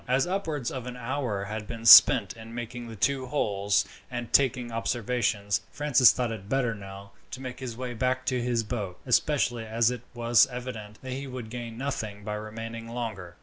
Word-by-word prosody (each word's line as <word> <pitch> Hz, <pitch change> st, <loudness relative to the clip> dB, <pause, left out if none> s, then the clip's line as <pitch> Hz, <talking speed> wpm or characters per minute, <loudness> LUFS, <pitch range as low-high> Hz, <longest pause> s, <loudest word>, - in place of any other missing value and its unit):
As 130 Hz, +2 st, +2 dB
upwards 165 Hz, -9 st, -2 dB
of 125 Hz, -2 st, -6 dB
an 125 Hz, 0 st, -6 dB
hour 125 Hz, -5 st, -2 dB
had 105 Hz, +1 st, -5 dB
been 115 Hz, -1 st, -7 dB
spent -, -, +9 dB
in 115 Hz, 0 st, -11 dB
making 120 Hz, 0 st, -6 dB
the 115 Hz, -, -8 dB
two 130 Hz, +4 st, 0 dB
holes 100 Hz, -7 st, +1 dB, 0.2 s
and 120 Hz, -2 st, -6 dB
taking 130 Hz, -3 st, +3 dB
observations, 115 Hz, -3 st, -1 dB
Francis 140 Hz, -4 st, +5 dB
thought 125 Hz, -2 st, -2 dB
it 105 Hz, -3 st, -7 dB
better 125 Hz, -3 st, +1 dB
now 100 Hz, -1 st, -10 dB, 0.2 s
to -, -, -7 dB
make 130 Hz, -1 st, -7 dB
his 125 Hz, -3 st, -6 dB
way 125 Hz, -1 st, -4 dB
back 130 Hz, +2 st, -1 dB
to 125 Hz, -2 st, 0 dB
his 120 Hz, -1 st, 0 dB
boat, 105 Hz, -5 st, -5 dB
especially 125 Hz, -2 st, +1 dB
as 115 Hz, +1 st, +1 dB
it 125 Hz, -3 st, -5 dB
was 120 Hz, -1 st, +4 dB
evident 120 Hz, -5 st, -7 dB
that 130 Hz, -, -6 dB
he 135 Hz, +1 st, -5 dB
would 125 Hz, -4 st, -7 dB
gain 120 Hz, -2 st, -6 dB
nothing 110 Hz, -6 st, -4 dB
by 105 Hz, 0 st, -4 dB
remaining 115 Hz, +2 st, -6 dB
longer. 110 Hz, -7 st, -5 dB
120 Hz, 190 wpm, -27 LUFS, 110-130 Hz, 0.2 s, spent